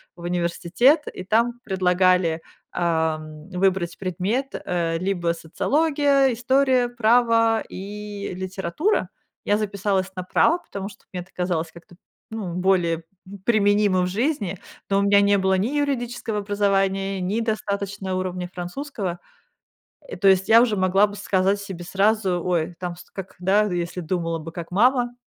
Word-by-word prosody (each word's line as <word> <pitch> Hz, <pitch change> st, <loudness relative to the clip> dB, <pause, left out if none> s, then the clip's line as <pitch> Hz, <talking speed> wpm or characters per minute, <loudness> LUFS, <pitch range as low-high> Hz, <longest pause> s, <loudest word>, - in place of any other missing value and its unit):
в 175 Hz, -, -14 dB
университет, 175 Hz, -, +2 dB
и 185 Hz, -, -7 dB
там 235 Hz, +4 st, +1 dB
предлагали, 180 Hz, -3 st, +2 dB, 0.3 s
ам, 160 Hz, -1 st, -2 dB
выбрать 180 Hz, -2 st, 0 dB
предмет: 195 Hz, +9 st, -2 dB
э, 170 Hz, -2 st, -1 dB
либо 175 Hz, -2 st, 0 dB
социология, 280 Hz, -, +2 dB
история, 255 Hz, +1 st, +2 dB
право 230 Hz, -1 st, +3 dB
и 205 Hz, +1 st, -6 dB
литература. 190 Hz, -, -1 dB, 0.4 s
Я 205 Hz, -, +2 dB
записалась 200 Hz, -2 st, -1 dB
на 185 Hz, -, -4 dB
право, 335 Hz, -, +3 dB
потому 200 Hz, -, -7 dB
что 195 Hz, -, -17 dB
мне 180 Hz, -, -3 dB
это 190 Hz, -, -25 dB
казалось 170 Hz, -3 st, -1 dB
как-то, 170 Hz, +1 st, -15 dB, 0.4 s
ну, 205 Hz, -6 st, -4 dB
более, 175 Hz, -3 st, +1 dB, 0.2 s
м, 200 Hz, +1 st, -10 dB
применимо 205 Hz, -4 st, +3 dB
в 180 Hz, -, 0 dB
жизни, 210 Hz, -, -1 dB, 0.3 s
но 195 Hz, 0 st, +3 dB
у -, -, +2 dB
меня 200 Hz, 0 st, +5 dB
не 200 Hz, 0 st, +4 dB
было 190 Hz, 0 st, +2 dB
ни 205 Hz, +6 st, 0 dB
юридического 240 Hz, -6 st, -2 dB
образования, 195 Hz, -1 st, 0 dB
ни 200 Hz, +6 st, -1 dB
достаточного 200 Hz, -3 st, -2 dB
уровня 180 Hz, -1 st, -4 dB
французского. 180 Hz, 0 st, -5 dB, 0.9 s
И -, -, -6 dB
то 195 Hz, -, +3 dB
есть, 190 Hz, +1 st, +4 dB
я 225 Hz, +1 st, +8 dB
уже 230 Hz, -4 st, +2 dB
могла 190 Hz, +2 st, +4 dB
бы 205 Hz, -, -9 dB
сказать 195 Hz, -1 st, +1 dB
себе 190 Hz, -3 st, -7 dB
сразу, 195 Hz, -1 st, +1 dB
ой, 175 Hz, -1 st, 0 dB
там 180 Hz, -1 st, -4 dB
ст 180 Hz, 0 st, -14 dB
как, 190 Hz, -1 st, -8 dB
да, 190 Hz, +4 st, +3 dB
если 175 Hz, -2 st, -3 dB
думала 165 Hz, -1 st, -2 dB
бы 160 Hz, +1 st, -8 dB
как 170 Hz, 0 st, -7 dB
мама, 245 Hz, +4 st, +2 dB
195 Hz, 150 wpm, -23 LUFS, 180-220 Hz, 0.9 s, я